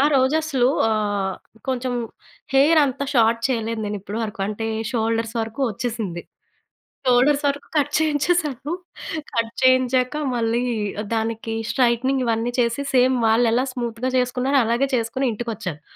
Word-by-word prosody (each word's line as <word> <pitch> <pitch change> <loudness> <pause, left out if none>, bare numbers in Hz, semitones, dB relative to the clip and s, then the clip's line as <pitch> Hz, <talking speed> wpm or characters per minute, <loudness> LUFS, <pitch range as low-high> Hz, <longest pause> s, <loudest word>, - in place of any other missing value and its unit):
ఆ - - +4
రోజు 260 +3 +3
అసలు 260 -5 +2 0.2
ఆహ్, 205 -3 -1 0.3
కొంచెం 255 0 -2 0.6
హెయిర్ 305 +3 +6
అంత 270 +1 -3
షార్ట్ 230 0 +4
చేయలేదు 230 -2 -1
నేను 205 0 -3
ఇప్పడి 205 +3 -5
వరకు. 210 -1 -7
అంటే 225 +1 -3 0.3
షోల్డర్స్ 225 0 0
వరకు 225 +4 -7
వచ్చేసింది. 220 -7 -4 0.9
షోల్డర్స్ 275 +4 +4
వరకు 280 0 -2
కట్ 290 -1 +2
చేయించేసాను. 305 -2 0 0.6
కట్ 230 -1 0
చేయించాక 255 +1 +3 0.2
మళ్ళీ 230 +1 +1 0.5
దానికి 225 0 -2 0.2
స్ట్రెయిట్నింగ్ 260 +1 +2
ఇవన్నీ 230 +1 0
చేసి 235 +3 +1
సేమ్ 255 0 +4
వాళ్ళు 225 +2 +4
ఎలా 250 - +2
స్మూత్‍గా 240 0 -3
చేసుకున్నారో 250 +2 +1
అలాగే 240 +4 +1
చేసుకొని 235 +3 -1
ఇంటికొచ్చాను. 210 -9 -5
240 Hz, 130 wpm, -22 LUFS, 225-260 Hz, 0.9 s, హెయిర్